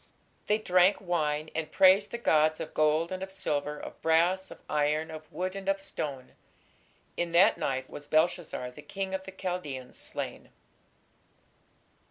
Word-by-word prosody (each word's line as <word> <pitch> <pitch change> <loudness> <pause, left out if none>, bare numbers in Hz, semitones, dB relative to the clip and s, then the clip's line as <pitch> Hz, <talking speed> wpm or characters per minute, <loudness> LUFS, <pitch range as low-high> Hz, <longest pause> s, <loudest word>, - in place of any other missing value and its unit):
They 210 - +3
drank 185 -2 +4
wine, 155 -4 -1
and 160 -1 -3
praised 190 +2 +6
the 235 - -4
gods 155 -8 +3
of 155 - -6
gold, 155 +2 +2
and 185 0 -4
of 190 0 -5
silver, 150 -5 -2
of - - -9
brass, 175 +4 +2
of - - -10
iron, 150 +2 0
of 155 -1 -10
wood, 185 +4 -3
and 195 0 -3
of 195 0 +1
stone.... 140 -8 -5 0.9
In 170 -1 -1
that 175 +3 +5
night 130 -1 -1
was 145 0 -10
Belshazzar 155 -5 +1
the 150 - -12
king 190 +5 -4
of 190 0 -3
the 190 - -7
Chaldeans 175 -9 -5
slain. - - -6
165 Hz, 160 wpm, -29 LUFS, 150-190 Hz, 0.9 s, praised